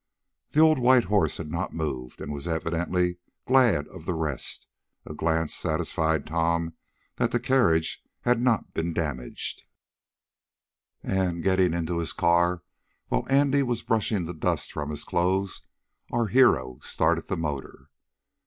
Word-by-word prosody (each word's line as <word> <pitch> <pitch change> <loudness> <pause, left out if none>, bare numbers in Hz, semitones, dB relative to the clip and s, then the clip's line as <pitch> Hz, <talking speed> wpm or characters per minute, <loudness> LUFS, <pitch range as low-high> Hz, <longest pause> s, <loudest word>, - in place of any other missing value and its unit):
The 150 - 0
old 155 -2 +6
white 125 0 +5
horse 95 -5 +1
had 75 -2 -6
not 85 +3 -3
moved, 65 -6 -4
and 75 - -5
was 70 +3 -6
evidently 85 +2 -1 0.3
glad 120 - +4
of 90 -4 -11
the 90 - 0
rest. 80 -5 -2 0.4
A - - -7
glance 80 0 0
satisfied 80 -1 0
Tom 85 +1 0 0.4
that 120 - +2
the 120 - 0
carriage 115 -11 +2 0.2
had 120 -1 +2
not 125 -3 +1
been 85 +1 -2
damaged, 70 -7 -3 1.4
and, 90 -3 -1
getting 95 -3 +3
into 85 0 -1
his 85 -1 -2
car, 85 0 +2 0.5
while - - -1
Andy 140 +1 +4
was 120 -3 -1
brushing 110 -5 0
the 85 - -5
dust 80 - -1
from 75 -1 -4
his 75 - -4
clothes, 95 +2 0 0.5
our 120 -1 +1
hero 80 - +3
started - - 0
the - - -2
motor. 75 -2 -5
85 Hz, 145 wpm, -26 LUFS, 80-110 Hz, 1.4 s, old